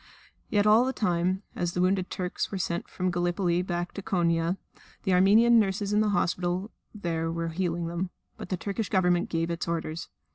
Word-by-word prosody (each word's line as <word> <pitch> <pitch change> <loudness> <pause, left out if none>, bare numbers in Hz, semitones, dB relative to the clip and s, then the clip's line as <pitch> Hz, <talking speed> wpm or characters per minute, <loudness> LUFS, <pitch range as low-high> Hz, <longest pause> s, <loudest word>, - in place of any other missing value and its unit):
Yet 205 -1 +2
all 215 +3 +6
the 260 +1 -1
time, 185 -1 0
as 175 0 -1
the - - -2
wounded 185 0 +1
Turks 180 -2 -3
were 195 - -2
sent 175 -2 -2
from 185 - -4
the 185 - +2
Gallipoli 175 0 0
front 180 - -7
back 175 0 -2
to 200 - -5
Konia, 170 -1 +1 0.5
the 190 - +1
Armenian 220 +6 +6
nurses 205 0 0
in 210 - +4
the 215 - +2
hospital 180 +1 0 0.2
there 165 -5 -2
were 165 0 -2
healing 170 0 -1
them. 170 +2 -3 0.3
But - - -9
the 185 - -1
Turkish 200 +3 -3
Government 180 -3 +2
gave 165 0 -1
its 170 - -3
orders. 165 -1 -3
180 Hz, 195 wpm, -28 LUFS, 170-195 Hz, 0.5 s, all